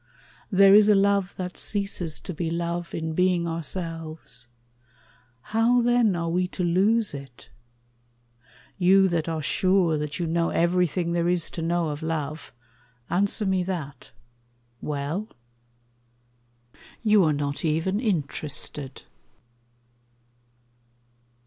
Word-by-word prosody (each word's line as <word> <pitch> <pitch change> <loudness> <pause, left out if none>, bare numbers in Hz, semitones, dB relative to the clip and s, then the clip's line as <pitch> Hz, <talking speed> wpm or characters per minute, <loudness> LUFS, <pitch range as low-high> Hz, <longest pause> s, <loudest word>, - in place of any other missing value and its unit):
There 195 0 +7
is 210 +1 +7
a 210 - +6
love 200 -1 +2
that 180 -1 -5
ceases 195 -6 -3
to 185 - -6
be 165 0 -3
love 170 +1 -3
In 160 -1 -3
being 180 0 +2
ourselves. 165 -5 -5 1.1
How, 235 +2 +3
then, 240 -5 +3
are 170 -1 -2
we 180 +2 0
to 180 - -4
lose 200 +5 +2
it? 135 -3 -10 1.3
You 190 +1 +5
that 165 -2 -1
are 160 -2 -3
sure 180 0 +2
that 150 0 -4
you 175 - -2
know 165 +1 0
everything 175 0 +1
There 170 0 +1
is 175 -2 0
to 165 - -5
know 170 0 0
of 150 +1 -5
love, 155 -1 -4 0.6
answer 200 +3 0
me 190 -1 +1
that. 150 -8 -5 0.7
Well?... 150 +8 -3 1.8
You 210 -3 +5
are 155 - +3
not 145 -1 -2
even 165 +5 0
interested. 150 - -3
170 Hz, 115 wpm, -25 LUFS, 160-195 Hz, 1.8 s, There